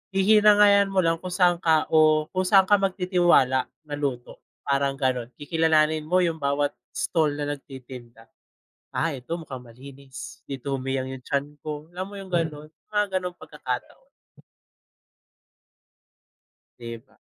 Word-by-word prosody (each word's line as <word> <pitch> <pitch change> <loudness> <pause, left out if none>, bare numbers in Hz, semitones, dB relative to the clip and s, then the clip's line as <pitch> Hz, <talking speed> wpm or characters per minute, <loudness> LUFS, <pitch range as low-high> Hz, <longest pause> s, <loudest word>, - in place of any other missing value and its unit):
hihinangayan 205 0 +6
mo 190 -1 +1
lang 165 0 +1
kung 185 - -5
saan 175 -2 +3
ka, 160 -3 +3
o 155 -1 +5
kung 185 - +1
saan 195 0 +6
ka 205 +1 +5
mag-titiwala 175 -9 +3 0.2
na 150 - -8
luto, 130 -4 -4 0.3
parang 140 0 +1
ganon, 130 -3 0
kikilalanin 155 0 +2
mo 180 +3 +2
yung 165 -2 -1
bawat 140 +1 +1 0.2
stall 160 -3 +1
na 145 - -2
nagtitinda. 130 -5 -9 0.7
"Ah, 165 -1 0
eto, 135 +6 -5
mukhang 135 -7 -8
malinis, 125 0 -11
dito 135 0 -4
humiyang 130 0 -3
yung 130 - -9
tiyan 145 +1 -2
ko," 150 0 -6
Alam 185 +1 -4
mo 205 - -10
yung 195 -1 -9
ganon? 155 -3 -2 0.2
Mga 205 -3 +1
ganong 180 -1 -6
pagkakataon. - - -7 2.7
'Di 115 -1 -7
ba. - - -30
155 Hz, 140 wpm, -25 LUFS, 135-180 Hz, 2.7 s, hihinangayan